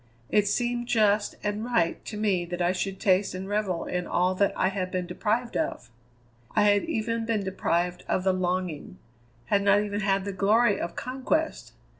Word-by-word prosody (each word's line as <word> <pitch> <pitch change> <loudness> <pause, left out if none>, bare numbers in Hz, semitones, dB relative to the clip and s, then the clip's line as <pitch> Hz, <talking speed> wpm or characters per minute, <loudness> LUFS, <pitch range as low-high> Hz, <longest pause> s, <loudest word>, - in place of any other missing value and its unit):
It 205 -1 +3
seemed 240 +2 0
just 215 -3 +2
and 210 +1 -2
right 230 -9 0
to 215 - -6
me 200 -4 +1
that 175 +1 -5
I 175 0 +2
should 190 +1 -3
taste 190 0 +2
and 190 +1 -5
revel 200 -4 -1
in 180 -1 -3
all 180 +1 +2
that 200 +1 +2
I 185 - +2
had 190 -2 -3
been 185 -1 -2
deprived 220 +7 -1
of. 125 - -2 0.6
I - - +4
had 205 -1 +4
even 230 -7 -1
been 225 -3 -1
deprived 180 -2 -1
of 185 - 0
the 190 0 +3
longing, 180 - -2 0.5
had 200 +11 +2
not 200 +1 +4
even 205 -1 -2
had 195 -1 +1
the 200 - -3
glory 205 +3 +3
of 170 - -4
conquest. 260 - -2
200 Hz, 185 wpm, -27 LUFS, 185-215 Hz, 0.6 s, I